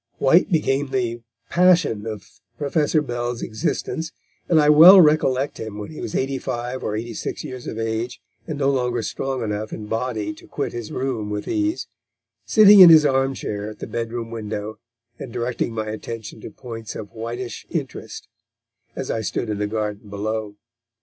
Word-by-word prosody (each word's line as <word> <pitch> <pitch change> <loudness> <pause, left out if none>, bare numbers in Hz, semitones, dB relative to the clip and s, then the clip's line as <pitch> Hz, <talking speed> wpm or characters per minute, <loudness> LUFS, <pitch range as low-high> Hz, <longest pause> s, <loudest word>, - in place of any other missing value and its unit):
White 165 +9 +4
became 145 -4 +1
the 120 -3 -2 0.3
passion 170 - +3
of 105 -3 -6 0.3
Professor 150 +2 +1
Bell's 120 -2 -3
existence, 160 +8 -3 0.4
and 165 - +5
I 150 - +4
well 165 +6 +10
recollect 150 -4 +3
him 110 -2 -6
when 105 +5 -7
he 155 - -8
was - - -5
eighty 135 0 -1
five 125 +2 -4
or 105 - -2
eighty 115 +2 -4
six - - -5
years 130 -1 -8
of - - -5
age, 115 +2 -3 0.3
and 155 -3 -4
no 140 -1 +2
longer 125 -3 -1
strong 135 +1 -3
enough 105 0 -3
in 105 - -6
body 115 +3 -2
to 155 - -16
quit 140 - -4
his 120 -3 -6
room 125 -5 -3
with 105 0 -4
ease, 315 +1 -1 0.6
sitting 210 -2 +8
in 180 -2 +11
his 155 -2 +8
arm 135 -1 +2
chair 105 -3 -4
at 110 - -10
the - - -6
bedroom 115 0 -4
window, 110 -1 -5 0.4
and 130 - -7
directing 120 0 -2
my 110 -1 -3
attention 110 0 -7
to - - -8
points 115 -3 -8
of 105 - -7
Whiteish 120 +2 -6
interest, 135 -8 -5 0.7
as 135 - -4
I 110 - -1
stood 110 +2 -2
in 105 - -3
the 105 - 0
garden 105 -1 -4
below. 105 +1 -3
120 Hz, 175 wpm, -22 LUFS, 110-140 Hz, 0.7 s, in